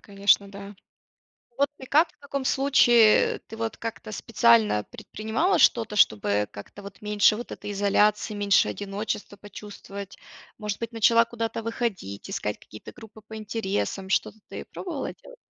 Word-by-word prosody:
конечно, 200 0 +2
да. 200 +1 -10 0.8
Вот 280 +1 +3
ты 260 - -10
как 310 +5 +3
в - - -37
таком 280 -1 -4
случае? 240 -5 +4
Ты, 225 - -9
вот, 225 0 -4
как-то 225 -1 -6
специально 115 - +3
предпринимала 225 - -2
что-то, 225 -3 +3
чтобы 105 - +2
как-то, 105 - -11
вот, 200 -1 -12
меньше 210 0 +3
вот 240 - -8
этой 205 - -7
изоляции, 205 +2 +2
меньше 205 -1 +3
одиночества 205 0 -5
почувствовать? 200 -1 -10 0.4
Может 210 -1 -4
быть, 230 0 -5
начала 230 0 +4
куда-то 230 -1 -4
выходить, 210 - -4
искать 105 0 -3
какие-то 110 - -12
группы 220 -3 -14
по 220 0 -9
интересам, 205 -2 -3
что-то 210 +2 0
ты - - -7
пробовала 325 -7 -6
делать? - - -16
210 Hz, 145 wpm, -25 LUFS, 200-230 Hz, 0.8 s, случае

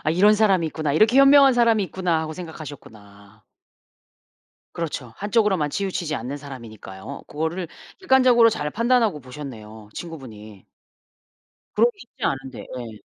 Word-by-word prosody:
'아 155 - +2
이런 200 +6 +5
사람이 195 -6 +3
있구나. 155 -2 -2
이렇게 215 - +4
현명한 275 0 +7
사람이 230 -3 +3
있구나.' 175 -2 -1
하고 155 0 -4
생각하셨구나. 110 - -11 1.3
그렇죠. 145 -8 -5
한쪽으로만 205 -6 +1
치우치지 180 -3 -2
않는 135 +3 -5
사람이니까요. 115 -4 -10
고거를 160 +3 -3 0.3
객관적으로 255 -8 +5
잘 150 -8 -2
판단하고 230 -5 +1
보셨네요 115 -6 -10
친구분이. 110 - -10 1.1
그러기 475 -3 +2
쉽지 240 - -10
않은데. 135 -2 -3 0.2
예. 115 -3 -9
160 Hz, 360 characters per minute, -23 LUFS, 125-210 Hz, 1.3 s, 현명한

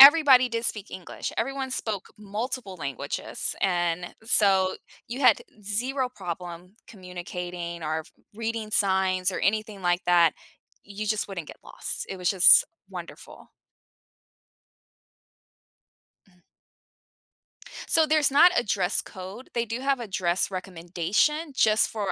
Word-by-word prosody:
everybody 275 -3 +9
did 230 0 -3
speak 210 -3 -3
English, 185 -2 -6
everyone 270 +2 -2
spoke 215 -6 -3
multiple 210 0 -5
languages, 140 -2 -3
and 175 -2 0
so 195 -5 +3 0.3
you 245 +3 -6
had 250 -6 +5 0.2
zero 250 +6 -1
problem 180 -3 -7
communicating 180 -2 -7
or 155 +1 -2 0.3
reading 225 -1 -4
signs 190 -2 +2
or - - -4
anything 210 -1 -1
like 175 0 +2
that. 170 -2 +5 0.5
You 205 +1 -6
just 215 -1 -1
wouldn't 170 -5 -6
get - - -11
lost - - -6
it 190 - -5
was 180 +1 0
just 190 -2 +7 0.2
wonderful. - - -10 2.8
Mm. 180 -2 -27 1.5
So, 320 -2 +5
there's 305 -2 +3
not 315 +6 +7
a - - +3
dress 195 -3 0
code, 190 +6 -10
they 235 0 +1
do 230 +3 -4
have 270 -1 0
a 235 - -5
dress 185 -1 0
recommendation 190 - -1
just 215 -3 +3
for 205 -4 -2
200 Hz, 125 wpm, -26 LUFS, 180-235 Hz, 2.8 s, everybody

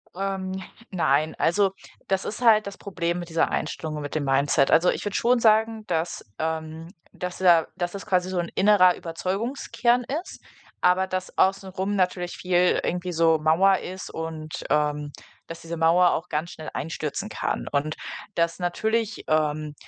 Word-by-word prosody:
Ähm. 190 -1 -3 0.4
Nein, 155 -4 +1
also 190 +3 +2 0.4
das 190 -1 0
ist 215 - -5
halt 215 -3 +5
das 200 - -7
Problem 175 -3 -3
mit 175 -1 -7
dieser 165 0 +1
Einstellung, 155 -1 -3
mit 145 +1 -6
dem 155 - 0
Mindset. 135 0 +2
Also, 175 +2 +5
ich - - -2
würde 205 - -3
schon 245 +1 +3
sagen, 220 0 +3
dass 165 0 -2 0.2
ähm, 160 0 -3 0.3
dass 180 0 -5
da 175 -3 +5
dass 175 -1 -2
das 200 - -7
quasi 185 -3 +1
so 185 -1 -1
'n 170 - -2
innerer 190 -2 +5
Überzeugungskern 235 +8 -1 0.2
ist, - - -12 0.4
aber 185 +1 +3
das 185 0 -4
Außenrum 195 +1 +1
natürlich 180 -1 -1
viel 180 0 +2
irgendwie 180 +1 -2
so 165 -1 +3
Mauer 180 +5 +4
ist 185 +1 -7
und, 160 -1 -5
ähm, 150 -1 0 0.4
dass 165 - -8
diese 165 0 -6
Mauer 170 +2 +4
auch 170 +3 -3
ganz 165 +4 -2
schnell 155 - -8
einstürzen 160 +6 -4
kann. - - -3
Und 150 +2 -1 0.4
dass 170 +1 0
natürlich, 220 +5 -1
ähm, 155 -1 0
180 Hz, 165 wpm, -25 LUFS, 160-195 Hz, 0.4 s, halt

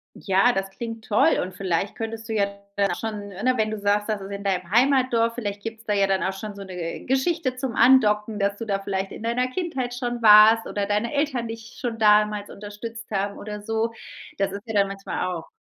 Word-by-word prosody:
Ja, 195 +5 +3
das 195 -4 -2
klingt 225 +1 -7
toll, 210 - +3
und 185 +1 -5
vielleicht 190 0 -2
könntest 225 0 -5
du 225 - -3
ja 205 -2 +2 0.3
dann 200 -2 +1
schon, 210 -1 -5
ne 210 +7 0
wenn 215 0 +1
du 215 - -4
sagst, 205 +1 +1
dass 210 -2 0
es 195 - -8
in 200 0 -6
deinem 185 -3 -1
Heimatdorf 240 -1 +3
vielleicht 205 -4 -4
gibt 225 0 -6
es 225 - -18
da 210 - 0
ja 200 -1 +3
dann 195 -1 +1
auch 190 - -1
schon 205 +2 -7
so 200 0 -9
'ne 180 -3 -6
Geschichte 265 +1 0
zum 255 -3 -4
Andocken, 215 -4 +4
dass 200 0 0
du 230 - -5
da 200 -2 -1
vielleicht 195 -1 -3
in - - -9
deiner 245 +2 0
Kindheit 265 -6 -3
schon 245 -1 -3
warst 215 +1 +7
oder 205 -1 -2
deine 210 +5 -1
Eltern 280 -5 0
dich 225 +1 -9
schon 235 -2 -3
damals 210 -1 +3
unterstützt 225 +3 -8
haben 200 0 -1
oder 210 0 -7
so. 225 +1 -1 0.4
Das 195 -1 0
ist 200 +1 -7
ja 220 - -4
dann 200 -1 +3
manchmal 195 -1 -4
auch 165 -2 -7
210 Hz, 225 wpm, -24 LUFS, 200-230 Hz, 0.4 s, warst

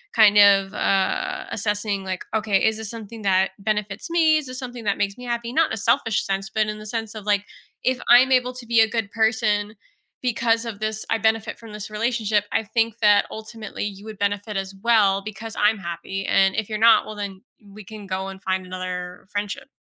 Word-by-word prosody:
kind 210 -2 +6
of, 195 -1 +6
uh, 375 - 0
assessing, 205 -1 -2
like, 185 -1 -4
"Okay, 215 -3 +1
is 220 0 +2
this 220 -2 -6
something 225 -1 -9
that 190 -1 +2
benefits 210 +3 -2
me? 320 -2 +4
Is 305 - -3
this 255 0 -7
something 245 -3 -7
that 200 - +1
makes 200 +1 -1
me 250 - -9
happy?" 235 -1 -3
Not 320 +4 +3
in - - -2
a - - -2
selfish 230 0 +1
sense, 195 0 -3
but 215 +1 0
in 210 0 -4
the 215 - -10
sense 225 0 -4
of, 210 -2 -8
like, 205 -1 +1 0.4
"If 255 0 +1
I'm 250 +2 +7
able 250 0 +3
to 250 -1 -9
be 230 0 +3
a 220 - +6
good 220 -3 -3
person 220 -2 +1 0.5
because 235 -1 +1
of 210 -3 -5
this, 215 0 -3
I 225 - +2
benefit 220 0 0
from 225 -2 -12
this 210 0 -7
relationship, 215 -2 0
I - - +2
think 225 +1 -1
that 210 -1 +5
ultimately 220 0 -7
you 200 0 -7
would 220 -2 -9
benefit 205 +1 -1
as 195 0 -4
well 210 -4 +4
because 215 +1 -7
I'm 210 0 +2
happy, 185 +2 -5
and 195 0 +3
if 220 -1 -2
you're 215 - -2
not, 225 0 +5
well, 215 - -7
then 200 -2 -6 0.2
we 205 +1 -12
can 210 +1 -10
go 190 0 -3
and 195 0 -8
find 190 0 -1
another 180 -1 -6
friendship." 205 +3 -4
215 Hz, 215 wpm, -23 LUFS, 200-230 Hz, 0.5 s, I'm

